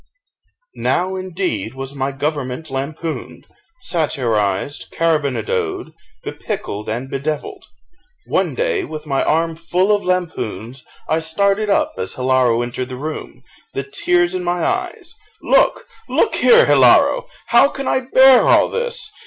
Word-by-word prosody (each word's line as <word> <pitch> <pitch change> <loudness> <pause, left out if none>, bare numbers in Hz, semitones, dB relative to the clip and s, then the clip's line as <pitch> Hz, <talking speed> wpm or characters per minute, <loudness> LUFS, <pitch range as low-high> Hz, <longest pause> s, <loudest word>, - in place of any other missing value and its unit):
Now, 185 +2 -1
indeed, 180 - -3
was 135 +1 -6
my 135 0 -2
government 145 0 -4
lampooned, 155 +4 -5 0.4
satirised, 120 - -1
carribonadoed, 360 - -1 0.3
bepickled, 105 - -5
and 120 +4 -3
bedevilled. 140 +3 -4 0.6
One - - 0
day, 485 -5 0
with 155 0 -7
my 135 -2 0
arm 165 +1 +1
full 180 +5 +1
of 205 - -4
lampoons, 135 - -3 0.2
I 160 - +1
started 200 +6 0
up 200 - +1
as 95 - -4
Hilaro 125 -2 +2
entered 125 +1 -5
the 130 - -6
room, 150 +4 -7 0.3
the 135 - -1
tears 175 +6 +1
in 185 -1 -3
my 175 0 -1
eyes: 365 -1 -3 0.3
"Look, - - +2 0.2
look - - +2
here, 485 +1 +5
Hilaro! - - +4 0.2
how 235 +4 +6
can 275 -1 -6
I - - +2
bear 260 0 +5
all - - +5
this? 485 +1 -3
160 Hz, 130 wpm, -19 LUFS, 135-205 Hz, 0.6 s, how